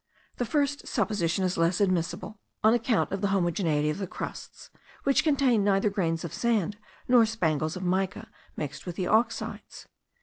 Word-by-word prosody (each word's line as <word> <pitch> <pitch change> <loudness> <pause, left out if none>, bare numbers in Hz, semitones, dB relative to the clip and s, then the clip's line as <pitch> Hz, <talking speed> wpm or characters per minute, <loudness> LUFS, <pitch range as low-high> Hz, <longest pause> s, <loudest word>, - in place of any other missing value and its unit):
The 245 - -1
first 285 +2 0
supposition 195 -6 0
is 185 -2 -1
less 165 +2 +2
admissible, 185 +2 -1 0.2
on 220 +1 +6
account 235 -1 +1
of 195 0 -3
the 200 - +2
homogeneity 175 -5 +1
of 150 - -5
the 195 - -3
crusts, - - -8 0.3
which 275 -1 +3
contain 270 -8 +3
neither 200 +1 +2
grains 165 -4 -1
of 170 - -6
sand, 210 -4 0 0.3
nor 245 -2 +6
spangles 160 -8 -1
of 185 - -5
mica, 190 +4 -1 0.3
mixed 150 +3 -5
with 175 - -4
the 185 - -2
oxides. 225 +4 -1
195 Hz, 165 wpm, -27 LUFS, 175-225 Hz, 0.3 s, on